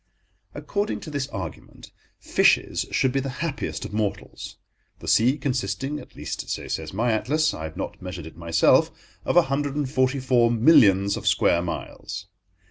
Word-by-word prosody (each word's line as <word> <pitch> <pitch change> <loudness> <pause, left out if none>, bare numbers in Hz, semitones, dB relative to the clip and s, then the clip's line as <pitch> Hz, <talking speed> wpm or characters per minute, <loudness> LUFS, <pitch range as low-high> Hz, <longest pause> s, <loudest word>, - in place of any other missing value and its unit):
According 205 +1 -2
to 155 - -8
this 140 -2 -2
argument, 95 - -8 0.3
fishes - - +2
should 130 - +1
be 135 - 0
the 135 +2 -4
happiest 150 -4 -4
of - - -8
mortals, 105 -2 -4 0.4
the - - -11
sea 125 +6 +4
consisting—at 130 +2 -3
least, - - -6
so - - -4
says - - -4
my 115 +5 0
atlas: 150 +8 +1
I 80 - -6
have 80 +2 -8
not 95 - -5
measured 90 -3 -7
it 80 - -11
myself—of 85 - +1
a 175 - +8
hundred 140 0 -2
and 145 -2 -1
forty 130 0 +1
four 125 -2 +3
millions 110 - +5
of - - -6
square 85 - +3
miles. 90 +2 -6
125 Hz, 160 wpm, -24 LUFS, 95-140 Hz, 0.4 s, a